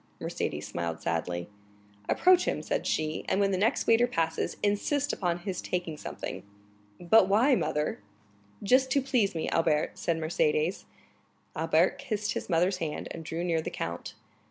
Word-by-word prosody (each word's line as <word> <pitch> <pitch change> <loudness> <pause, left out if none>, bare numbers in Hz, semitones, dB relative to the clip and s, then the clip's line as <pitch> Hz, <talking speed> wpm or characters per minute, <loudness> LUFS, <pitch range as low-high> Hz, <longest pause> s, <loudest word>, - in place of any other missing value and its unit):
Mercédès - - -3
smiled 85 -1 -4
sadly. 85 +1 -2 0.6
"Approach 365 0 +5
him," - - -1
said - - -2
she, 155 0 -1
"and 190 - +1
when 200 -1 +2
the - - +1
next 225 +6 +1
waiter 230 +2 +4
passes, 165 -8 -1
insist 265 +8 +1
upon 175 -3 -1
his 190 -1 -4
taking 175 -3 -3
something." - - -6 0.6
"But 185 +3 +5
why, 225 +8 +4
mother?" 150 -10 0 0.6
"Just 260 +5 +4
to 280 - +3
please 235 -8 +1
me, 160 - -2
Albert," 155 -2 +1
said 170 -1 0
Mercédès. 455 - 0 0.7
Albert - - +2
kissed 215 -6 -2
his - - -5
mother's 180 +2 +2
hand, 160 -4 -4
and 165 - -7
drew 165 +2 -4
near 165 -2 +1
the - - -4
count. 85 +1 -5
180 Hz, 155 wpm, -29 LUFS, 160-230 Hz, 0.7 s, Approach